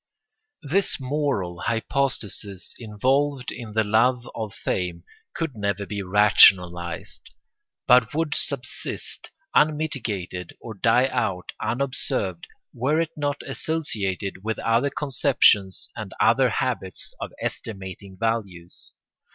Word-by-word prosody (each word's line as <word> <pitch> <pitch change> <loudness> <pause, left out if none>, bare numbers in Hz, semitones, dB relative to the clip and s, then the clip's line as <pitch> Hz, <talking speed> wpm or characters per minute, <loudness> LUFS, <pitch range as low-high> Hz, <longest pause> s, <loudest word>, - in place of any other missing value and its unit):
This 180 +7 +2
moral 130 - -1
hypostasis 115 -5 -2
involved 130 +5 0
in 115 -4 -8
the 110 0 +3
love 120 +4 +2
of 110 -2 -4
fame 90 -2 -2 0.3
could 165 -6 -3
never 100 -1 -1
be 100 0 -4
rationalised, 90 -3 +4 0.6
but 125 -1 +5
would 160 -1 0
subsist 130 -2 -4 0.2
unmitigated 120 - 0
or 115 - -8
die 115 +4 +3
out 90 -8 -1
unobserved, 110 -7 -1 0.3
were 140 +6 +1
it 165 -1 0
not 145 -1 -2
associated 100 - -2
with 110 0 -2
other 115 +5 +2
conceptions 135 - +3
and - - -7
other - - +4
habits 95 -1 -2
of - - -4
estimating 95 -2 -5
values. 100 -7 -3
115 Hz, 105 wpm, -24 LUFS, 95-135 Hz, 0.6 s, but